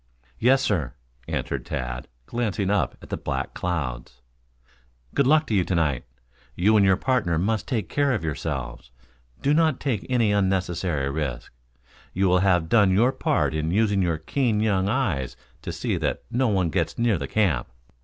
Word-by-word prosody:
"Yes, 130 +3 +4
sir," 80 - -1 0.3
answered - - -3
Tad, 60 -1 -4 0.2
glancing 105 - -1
up 105 - 0
at - - -12
the - - -2
black 65 -2 -3
clouds. 65 -9 -4 0.9
"Good 140 - +2
luck 155 +2 +4
to 115 - -3
you 95 -3 +3
to 90 - -2
night. 75 -7 0 0.5
You 105 +5 +3
and 105 - +5
your 95 -1 +5
partner 110 -10 +1
must 105 +5 0
take 110 -8 -1
care 145 -1 +1
of 110 -9 -1
yourselves. 75 -4 -4 0.5
Do 145 - +3
not 155 -3 +2
take 125 -8 -2
any 120 -4 +2
unnecessary 90 -7 0
risk. 70 -6 -4 0.6
You 95 +1 +2
will 90 0 +4
have 90 -4 +2
done 105 +1 +4
your 110 +7 +4
part - - 0
in 80 +1 -1
using 100 +1 +2
your 85 -3 +1
keen 110 - 0
young 100 -3 +1
eyes 95 - -1 0.2
to - - -5
see - - -2
that - - -2
no 125 +2 +2
one 95 -6 +1
gets - - -1
near 115 -6 +2
the 70 - -4
camp." 90 - +1
95 Hz, 175 wpm, -24 LUFS, 80-115 Hz, 0.9 s, and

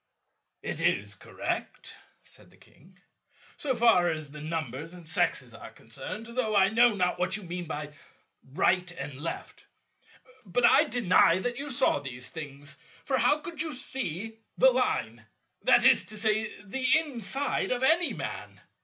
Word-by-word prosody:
"It - - -3
is - - +1
correct," - - -5 0.3
said - - -18
the - - -22
King, - - -22 0.6
"so 265 -3 -1
far 225 -7 +4
as 155 -3 -4
the 150 0 -8
numbers 155 0 -4
and 175 -3 -12
sexes 160 - 0
are - - -10
concerned, 220 - -8
though 235 -2 -2
I 195 -1 +5
know 230 +1 +4
not 180 -2 0
what 180 +3 0
you 210 - -10
mean 175 0 -5
by 150 -2 -6 0.6
'right' 180 +5 +2
and 145 -3 -6
'left.' 165 - -6 0.8
But 235 +4 +1
I - - +6
deny 185 -7 +4
that 245 +6 -3
you 290 +1 -5
saw 260 - +2
these 125 -2 -7
things. 145 -2 -7 0.3
For 265 -2 +1
how 290 +6 +3
could 330 -2 -5
you 320 -2 -2
see 225 -4 -4 0.2
the - - +6
Line, - - -1 0.4
that 245 -1 +5
is 265 -2 +5
to 215 - -9
say 215 0 0
the 260 +6 -4
inside, 275 -3 -1
of 250 0 -1
any 330 +5 +3
Man? - - -6
210 Hz, 160 wpm, -28 LUFS, 165-250 Hz, 0.8 s, I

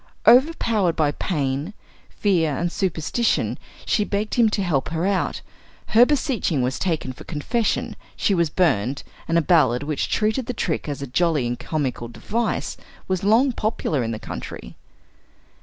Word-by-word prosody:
Overpowered 230 - +4
by 150 -3 +2
pain, 145 +3 -2 0.3
fear 165 -8 +1
and 175 0 -1
superstition, 190 +6 0 0.3
she 210 - +2
begged 205 +1 -2
him 235 -3 +4
to 210 -2 -1
help 150 -7 0
her 165 +2 -1
out; 195 -1 0 0.5
her 235 +3 +6
beseeching 250 - 0
was 125 +1 -1
taken 160 -8 -1
for - - -12
confession, 210 - -1 0.2
she 200 - +1
was 170 -4 +2
burned, 140 - +1 0.2
and 165 - +2
a 170 - +3
ballad 145 -8 +3
which 150 -1 -2
treated 220 +3 0
the 250 - -2
trick 160 -2 -2
as 140 -1 -4
a - - -2
jolly 150 +1 +1
and 120 0 -3
comical 135 -6 -2
device, 225 - -2 0.3
was 185 -1 -1
long 230 +7 +4
popular 215 - -1
in 115 - -2
the 115 - -3
country. - - -8
170 Hz, 155 wpm, -23 LUFS, 140-215 Hz, 0.5 s, her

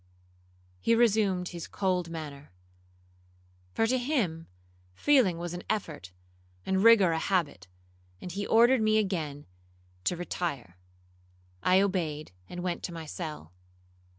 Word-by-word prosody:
He 230 - +3
resumed 205 -6 +2
his 170 -2 -7
cold 180 -3 -1
manner; 150 - -8 1.2
for 225 - +3
to 255 +3 +1
him 230 - -1 0.5
feeling 240 - +3
was 170 0 -5
an 175 - -5
effort, 155 - -3 0.5
and 190 +1 +1
rigour 220 -6 +7
a 160 - 0
habit, 160 - -1 0.5
and 180 - -7
he 200 +3 -4
ordered 235 +2 +5
me 215 0 +3
again 160 -9 -2 0.6
to 180 - 0
retire. 145 - -4 0.9
I 185 +1 +4
obeyed, 165 -6 -2 0.2
and 175 0 -6
went 180 -1 -2
to - - -5
my 165 -1 -7
cell. 150 - -7
180 Hz, 125 wpm, -29 LUFS, 160-205 Hz, 1.2 s, rigour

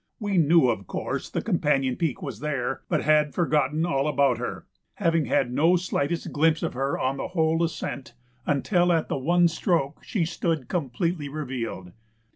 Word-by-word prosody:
We 205 -4 +1
knew, 160 -3 +5
of 105 -6 -1
course, - - -4
the - - -3
companion 135 -3 +1
peak 160 -7 -2
was 130 -7 -6
there, 140 -4 -2
but - - +1
had 150 -1 +3
forgotten 155 -2 +1
all 140 -4 0
about 140 -4 +2
her, 125 - -5 0.3
having 165 -5 +1
had 125 -2 +1
no 165 +7 +4
slightest 170 -2 -2
glimpse 160 +2 +2
of 165 - -2
her 135 +2 -1
on 135 +1 -1
the - - -3
whole 165 -1 +1
ascent 140 -6 -4 0.3
until 175 +5 +2
at 165 -2 +1
the - - -1
one 175 +5 +3
stroke 165 -4 -1
she 195 -8 -1
stood 165 -4 -2
completely 160 0 -2
revealed. 125 -11 -5
150 Hz, 170 wpm, -25 LUFS, 135-170 Hz, 0.3 s, knew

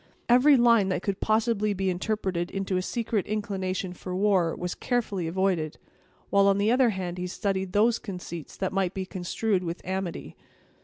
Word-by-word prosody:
Every 260 +4 +6
line 230 -5 +4
that 185 -1 -1
could 200 -1 -2
possibly 215 -1 +1
be 190 0 0
interpreted 185 -2 -2
into 195 -1 -2
a 185 - +1
secret 225 0 -2
inclination 190 -3 -2
for 180 0 -6
war, 190 -4 +2
was 180 0 -3
carefully 210 -8 -1
avoided; 175 -3 0 0.5
while, 200 0 +5
on 200 0 +4
the 205 +2 +2
other 250 0 +4
hand, 180 -3 -4
he 180 - -2
studied 190 0 -2
those 225 +3 +3
conceits 180 - -7
that 190 -1 -2
might 190 -1 0
be 190 -1 -3
construed 185 +2 -1
into 170 0 -6
amity. 185 - -4
190 Hz, 170 wpm, -27 LUFS, 180-215 Hz, 0.5 s, Every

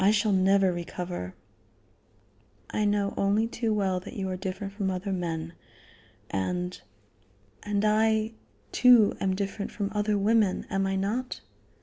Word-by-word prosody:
I 195 - +6
shall 210 0 +3
never 190 0 +4
recover." 175 - -5 1.4
"I 210 - 0
know 205 -1 +1
only 200 +3 +2
too 230 -1 -2
well 195 -3 +1
that 180 - -10
you 195 -2 -2
are 185 - -2
different 195 +1 -5
from 200 -2 -1
other 190 +2 -3
men, 165 -2 -3 0.8
and 180 - -2 0.8
and 205 0 -1
I, 220 +1 +2 0.4
too, 245 -4 +6
am 190 -1 0
different 200 +1 -3
from 200 -1 -3
other 210 0 +1
women 210 -1 +2
am 195 0 +1
I 195 - -1
not?" 220 +7 -2
200 Hz, 140 wpm, -28 LUFS, 185-210 Hz, 1.4 s, I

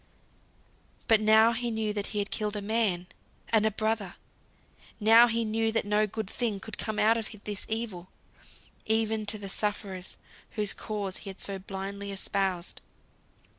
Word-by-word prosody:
But 220 -1 +5
now 220 +1 +6
he 240 +1 -2
knew 220 -2 -1
that 205 -1 -1
he 210 - -5
had 205 -1 -1
killed 210 0 -2
a 210 - -2
man, 205 -5 +1 0.4
and 220 -1 +4
a - - +4
brother, 215 -3 -2 0.8
now 225 +2 +8
he 230 0 0
knew 225 +1 +1
that 225 - 0
no 210 +1 +2
good 215 0 -4
thing 220 -2 -1
could 220 - -9
come 215 -1 -3
out 225 +2 +4
of 225 - -4
this 205 -2 -4
evil, 215 -6 -3 0.8
even 220 -1 +1
to 215 +1 +3
the 200 -1 -6
sufferers 195 -2 -3 0.4
whose 210 -2 +4
cause 205 -3 -4
he 200 - -8
had 190 - -9
so 195 -1 -3
blindly 195 +1 -5
espoused. 190 -2 -1
215 Hz, 165 wpm, -29 LUFS, 200-220 Hz, 0.8 s, now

